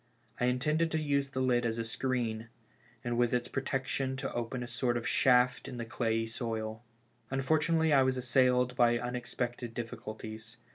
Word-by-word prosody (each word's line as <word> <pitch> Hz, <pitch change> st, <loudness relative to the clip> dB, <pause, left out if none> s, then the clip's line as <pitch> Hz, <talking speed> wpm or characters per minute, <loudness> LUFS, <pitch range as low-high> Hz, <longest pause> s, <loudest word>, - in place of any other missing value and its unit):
I 125 Hz, -, +2 dB
intended 150 Hz, +6 st, +2 dB
to 160 Hz, -, 0 dB
use 140 Hz, -2 st, 0 dB
the 130 Hz, -1 st, -2 dB
lid 125 Hz, -1 st, +2 dB
as 115 Hz, -1 st, -1 dB
a 115 Hz, -, -1 dB
screen, 115 Hz, -2 st, -2 dB, 0.6 s
and 120 Hz, -1 st, -1 dB
with 120 Hz, 0 st, +3 dB
its 120 Hz, 0 st, -1 dB
protec 135 Hz, -1 st, -2 dB
tion 130 Hz, 0 st, -2 dB
to 135 Hz, 0 st, -3 dB
open 120 Hz, +1 st, -3 dB
a -, -, -6 dB
sort 120 Hz, 0 st, 0 dB
of 115 Hz, -, -3 dB
shaft 125 Hz, 0 st, +3 dB
in 130 Hz, -3 st, -6 dB
the 115 Hz, -, -4 dB
clayey 115 Hz, -1 st, 0 dB
soil. 110 Hz, -1 st, -4 dB, 0.5 s
Unfor 135 Hz, +4 st, +2 dB
tunately 160 Hz, 0 st, +2 dB
I -, -, +7 dB
w'as 130 Hz, 0 st, +2 dB
assailed 125 Hz, 0 st, +3 dB
by 120 Hz, -1 st, +4 dB
unexpected 120 Hz, -1 st, -4 dB
difficulties. 110 Hz, -1 st, -7 dB
125 Hz, 180 wpm, -31 LUFS, 115-130 Hz, 0.6 s, I